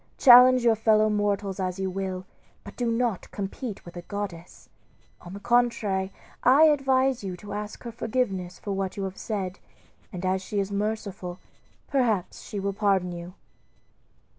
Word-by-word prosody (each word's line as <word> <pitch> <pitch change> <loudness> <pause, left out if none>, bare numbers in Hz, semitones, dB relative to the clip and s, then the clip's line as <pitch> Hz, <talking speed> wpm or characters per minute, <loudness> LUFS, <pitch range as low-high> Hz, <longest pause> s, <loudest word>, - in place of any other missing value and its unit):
Challenge 255 -1 +8
your 235 -1 +5
fellow 215 0 +3
mortals 205 -2 -1
as 185 -1 -2
you 190 -1 -2
will, 185 -1 -4 0.4
but - - -11
do 240 -2 -1
not 230 -4 -1
compete 205 +2 -6
with 175 - -11
a 175 - -6
goddess. 185 -3 -7 0.5
On 175 - -10
the 200 - -7
contrary, 215 -5 +1 0.3
I 270 +5 +6
advise 270 -5 +3
you 185 -2 -5
to 205 +3 -9
ask 210 +1 -6
her 235 - -6
forgiveness 200 -7 -2
for 205 - -6
what 195 -1 -3
you 200 - -2
have 190 0 -5
said, 190 -4 -4 0.5
and 185 0 -5
as 185 0 +1
she 205 +2 -3
is 195 0 -2
merciful 200 -3 -3 0.5
perhaps 235 -9 0
she 205 - -6
will 200 0 -2
pardon 195 -3 +1
you." 175 +1 -8
200 Hz, 165 wpm, -26 LUFS, 190-230 Hz, 0.5 s, Challenge